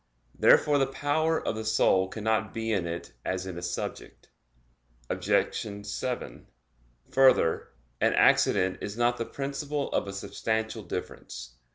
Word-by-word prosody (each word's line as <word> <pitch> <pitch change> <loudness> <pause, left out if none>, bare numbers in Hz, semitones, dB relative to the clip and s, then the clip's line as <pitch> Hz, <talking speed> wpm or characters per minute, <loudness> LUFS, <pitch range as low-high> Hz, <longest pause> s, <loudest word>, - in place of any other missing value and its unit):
Therefore 145 -1 +5
the 135 - +2
power 155 +4 0
of - - +1
the 110 - -4
soul 110 -3 +3
cannot 110 +2 -1
be 115 0 -2
in 95 -5 0
it 85 -6 -6
as 95 0 -2
in 95 -2 -6
a 85 - -6
subject. 90 - -6 0.8
Obj. 105 -1 -1
7: 125 +4 -4 0.6
Further, 130 -11 +4 0.3
an - - +3
accident 90 0 +4
is 105 +2 -5
not 120 0 +2
the 115 - -2
principle 140 +2 -3
of - - 0
a 100 - -5
substantial 110 +3 -2
difference. - - -7
110 Hz, 140 wpm, -28 LUFS, 95-135 Hz, 0.8 s, Therefore